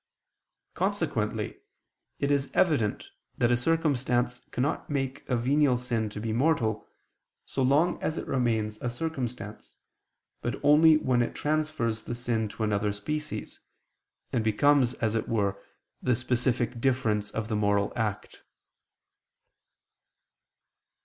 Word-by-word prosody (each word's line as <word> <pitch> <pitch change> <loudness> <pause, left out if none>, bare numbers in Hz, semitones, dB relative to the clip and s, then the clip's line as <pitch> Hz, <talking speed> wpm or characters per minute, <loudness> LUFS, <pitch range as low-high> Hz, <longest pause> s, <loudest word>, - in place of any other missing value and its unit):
Consequently - - -1 0.6
it 140 0 0
is 140 -1 +1
evident 140 - +1 0.3
that 120 0 +3
a - - +5
circumstance 125 -4 +1
cannot 130 +4 -2
make 135 -2 -2
a 125 - +2
venial 130 +2 +3
sin 120 -3 -2
to 105 - -7
be 110 0 -2
mortal, 120 -5 +1 0.6
so 135 - -3
long 145 +7 +3
as 155 - -1
it - - -3
remains 110 -4 0
a 125 - -1
circumstance, 125 -6 -5 0.7
but - - -3
only 155 +2 +7
when 130 -5 +1
it 120 - -2
transfers 150 -7 -1
the 120 - -3
sin 120 -2 -1
to 110 +2 -5
another 105 -1 +1
species, 150 +10 -5 0.7
and 115 - +1
becomes, 130 +3 +3
as 110 -2 -1
it 115 - -1
were, 100 -3 0 0.4
the 125 - +2
specific 120 -1 -1
difference 115 -6 +1
of 110 0 -4
the 110 - -1
moral 100 -1 +1
act. 110 -4 -3
120 Hz, 125 wpm, -28 LUFS, 110-140 Hz, 0.7 s, only